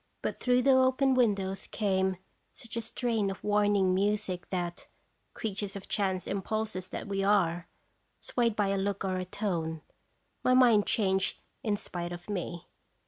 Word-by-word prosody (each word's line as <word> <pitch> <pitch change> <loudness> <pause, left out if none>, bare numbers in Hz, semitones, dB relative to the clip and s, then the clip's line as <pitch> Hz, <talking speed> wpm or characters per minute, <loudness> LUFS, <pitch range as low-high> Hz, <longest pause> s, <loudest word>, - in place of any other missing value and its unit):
But - - -2
through 250 0 +3
the 270 - +5
open 260 +1 +4
windows 200 -6 +1
came 190 -3 0 0.3
such 235 -3 -10
a 230 - -1
strain 225 -3 -1
of 195 - -6
warning 205 -2 +3
music 195 -2 0
that, 175 -1 -3 0.5
creatures 205 -2 -3
of 195 - -7
chance 190 -3 0
impulses 200 -1 -2
that - - -5
we 195 -1 -1
are, 175 -4 +2 0.5
swayed 235 -3 0
by 205 -2 +1
a 195 0 +1
look 200 0 -1
or 185 -1 0
a 185 - -3
tone, 170 -5 -2 0.6
my 255 - +4
mind 235 -5 +5
changed 190 -3 +1 0.2
in 210 -3 0
spite 175 -4 -5
of 175 +3 -7
me. 175 -3 -4
200 Hz, 155 wpm, -30 LUFS, 185-220 Hz, 0.6 s, the